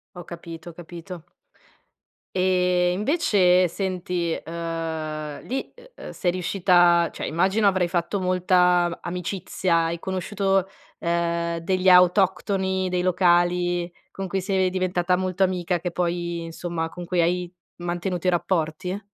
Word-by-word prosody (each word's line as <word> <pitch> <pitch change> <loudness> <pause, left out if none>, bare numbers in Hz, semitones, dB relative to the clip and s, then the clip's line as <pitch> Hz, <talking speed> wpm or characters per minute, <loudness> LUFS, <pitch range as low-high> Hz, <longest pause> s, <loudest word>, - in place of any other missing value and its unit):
Ho 175 -1 -8
capito, 170 -1 -9
ho - - -11
capito. 175 0 -9 1.1
Ehm, 180 -1 +2
invece 190 - +3
senti, 180 -2 -2
uhm, 160 -2 -4
lì, 265 +2 -3 0.2
uhm, - - -9
sei 180 - 0
riuscita, 175 -1 +3
cioè - - -5
immagino 190 +6 +1
avrai 185 -3 +2
fatto 175 +3 -1
molta 180 -1 +2
amicizia, 175 -1 -1
hai 170 +1 -3
conosciuto, 190 +1 -1 0.3
ehm, 170 0 -1
degli 185 +2 0
autoctoni, 190 +1 +3
dei 180 0 0
locali, 175 -1 +2 0.2
con 195 -1 -5
cui 190 +2 -1
sei 190 -1 +1
diventata 180 -1 0
molto 185 +1 -2
amica, 180 -2 0
che 180 +1 -3
poi, 170 -1 -2
insomma 165 0 -4
con 175 +2 -8
cui 175 0 0
hai 175 +1 0 0.3
mantenuto 175 +1 -2
i - - +6
rapporti? 180 +2 -1
180 Hz, 125 wpm, -24 LUFS, 170-185 Hz, 1.1 s, i